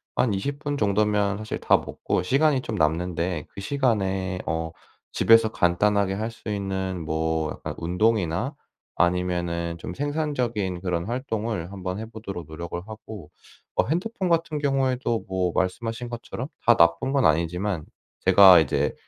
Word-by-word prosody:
한 115 Hz, -5 st, +2 dB
20 140 Hz, +9 st, -3 dB
분 145 Hz, -1 st, -3 dB
정도면 105 Hz, -2 st, +1 dB
사실 110 Hz, 0 st, -5 dB
다 -, -, +4 dB
먹고 -, -, -2 dB
시간이 140 Hz, +5 st, +3 dB
좀 110 Hz, -, -4 dB
남는데, 85 Hz, 0 st, 0 dB
그 100 Hz, -, -9 dB
시간에 95 Hz, -8 st, 0 dB
어 80 Hz, 0 st, -2 dB, 0.4 s
집에서 115 Hz, -1 st, +5 dB
간단하게 100 Hz, +2 st, +2 dB
할 110 Hz, +3 st, -2 dB
수 110 Hz, -1 st, -9 dB
있는 95 Hz, -3 st, -3 dB
뭐 80 Hz, 0 st, -1 dB
약간 -, -, -6 dB
운동이나, 90 Hz, -, 0 dB, 0.4 s
아니면은 85 Hz, -1 st, 0 dB
좀 -, -, -6 dB
생산적인 125 Hz, -, -2 dB
그런 85 Hz, -2 st, -1 dB
활동을 110 Hz, -6 st, -3 dB
한번 95 Hz, -1 st, -4 dB
해 110 Hz, -, -5 dB
보도록 100 Hz, -7 st, -7 dB
노력을 85 Hz, +2 st, -6 dB
하고 110 Hz, -6 st, -10 dB, 0.4 s
어 -, -, +3 dB
핸드폰 190 Hz, -, -1 dB
같은 165 Hz, -3 st, +1 dB
경우에도 130 Hz, -4 st, 0 dB
뭐 95 Hz, -2 st, 0 dB
말씀하신 115 Hz, +6 st, -2 dB
것처럼 120 Hz, +2 st, -6 dB, 0.2 s
다 120 Hz, -, +7 dB
나쁜 85 Hz, +10 st, +3 dB
건 140 Hz, -2 st, +3 dB
아니지만 85 Hz, +2 st, +1 dB, 0.4 s
제가 95 Hz, -2 st, +8 dB
이제 80 Hz, -, +1 dB
100 Hz, 300 characters per minute, -25 LUFS, 90-120 Hz, 0.4 s, 제가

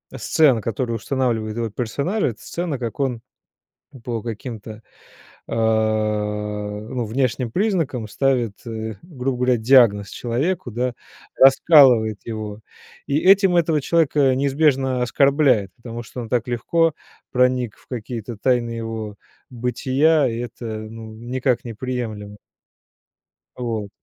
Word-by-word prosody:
сцен, 135 Hz, -8 st, +3 dB
которую 115 Hz, +1 st, -2 dB
устанавливает 115 Hz, -3 st, -1 dB
его 115 Hz, -1 st, -1 dB
персоналия- 140 Hz, -, -1 dB
это 110 Hz, -, -9 dB
сцена, 170 Hz, -6 st, -4 dB
как 120 Hz, +2 st, -5 dB
он 125 Hz, -4 st, -1 dB, 0.8 s
по 120 Hz, -2 st, -3 dB
каким-то, 110 Hz, -1 st, -7 dB, 0.7 s
а, -, -, -4 dB, 1.3 s
ну 115 Hz, +2 st, -4 dB
внешним 125 Hz, +1 st, -1 dB
признакам 165 Hz, -, -1 dB
ставит, 125 Hz, -2 st, 0 dB
э, 110 Hz, -1 st, -5 dB
грубо 135 Hz, -7 st, -4 dB
говоря, 125 Hz, 0 st, +2 dB
диагноз 110 Hz, -4 st, +4 dB
человеку, 135 Hz, +7 st, -2 dB
да, 120 Hz, +2 st, -2 dB, 0.4 s
раскалывает 130 Hz, -6 st, +6 dB
его, 110 Hz, -2 st, -5 dB, 0.5 s
и 140 Hz, -, +1 dB
этим 190 Hz, +1 st, +5 dB
этого 160 Hz, -3 st, +2 dB
человека 145 Hz, -4 st, +2 dB
неизбежно 135 Hz, -2 st, +1 dB
оскорбляет, 135 Hz, -5 st, +3 dB
потому 120 Hz, -1 st, -8 dB
что 125 Hz, +3 st, -8 dB
он 115 Hz, -, -7 dB
так 120 Hz, -1 st, 0 dB
легко 160 Hz, +7 st, +1 dB, 0.4 s
проник 125 Hz, -3 st, +1 dB
в -, -, -25 dB
какие-то 115 Hz, -2 st, -6 dB
тайны 120 Hz, 0 st, +1 dB
его 115 Hz, -2 st, -5 dB, 0.3 s
бытия, 130 Hz, +5 st, +2 dB
и 115 Hz, -, -4 dB
это, 120 Hz, 0 st, -7 dB
ну, 110 Hz, 0 st, -7 dB
никак 125 Hz, +2 st, -1 dB
не 115 Hz, -, -5 dB
приемлемо. 110 Hz, -4 st, -5 dB, 1.2 s
Вот. 115 Hz, -4 st, -3 dB
125 Hz, 120 wpm, -21 LUFS, 115-135 Hz, 1.3 s, раскалывает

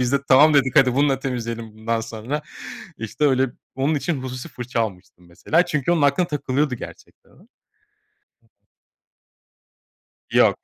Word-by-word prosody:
Biz 125 Hz, +1 st, 0 dB
de -, -, +5 dB
"Tamam." 150 Hz, +3 st, +7 dB
dedik, 130 Hz, -3 st, +3 dB
hadi 130 Hz, -2 st, +5 dB
bununla 140 Hz, -1 st, +2 dB
temizleyelim 115 Hz, -4 st, -4 dB
bundan 115 Hz, +1 st, -2 dB
sonra. 115 Hz, +6 st, -5 dB, 0.6 s
İşte 115 Hz, +6 st, -3 dB
öyle, 130 Hz, -2 st, +3 dB, 0.2 s
onun 135 Hz, +4 st, 0 dB
için 150 Hz, -1 st, -2 dB
hususi 125 Hz, -1 st, -6 dB
fırça 120 Hz, -1 st, -4 dB
almıştı 95 Hz, -5 st, -5 dB
mesela. 120 Hz, -, 0 dB
Çünkü, 150 Hz, -1 st, -1 dB
onun 160 Hz, -4 st, +1 dB
aklına 145 Hz, +5 st, +3 dB
takılıyordu 140 Hz, -2 st, -1 dB
gerçekten -, -, -12 dB
o. 195 Hz, -, -22 dB, 2.9 s
Yok. -, -, +4 dB
130 Hz, 135 wpm, -22 LUFS, 115-145 Hz, 2.9 s, Tamam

